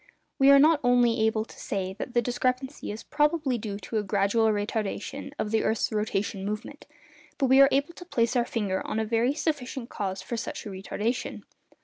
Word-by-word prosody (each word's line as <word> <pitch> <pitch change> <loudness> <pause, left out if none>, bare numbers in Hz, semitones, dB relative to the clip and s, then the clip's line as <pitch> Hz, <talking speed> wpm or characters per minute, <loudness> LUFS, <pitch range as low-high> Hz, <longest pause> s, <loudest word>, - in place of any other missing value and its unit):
We 270 0 +6
are 280 - +9
not 305 +2 +5
only 245 -2 +3
able 220 0 0
to - - -15
say 190 -1 -3
that 245 - -6
the 240 - +3
discrepancy 255 +3 -2
is 215 - -7
probably 295 -4 +1
due 205 -2 -4
to 225 - -4
a - - -2
gradual 200 +3 +2
retardation 215 +6 -3
of 210 - -2
the 225 - +2
earth's 220 - 0
rotation 210 -2 -1
movement, 210 +3 -5 0.5
but 275 - +2
we 265 +1 +6
are 275 - +8
able 280 +5 +1
to 355 - -11
place 240 -7 0
our 240 - +3
finger 200 -6 -2
on - - -2
a 220 - 0
very 230 +5 +1
sufficient 270 -6 -3
cause 190 -1 -4
for 235 +5 -4
such 225 - -5
a - - -5
retardation. 205 +5 -3
230 Hz, 200 wpm, -27 LUFS, 210-265 Hz, 0.5 s, are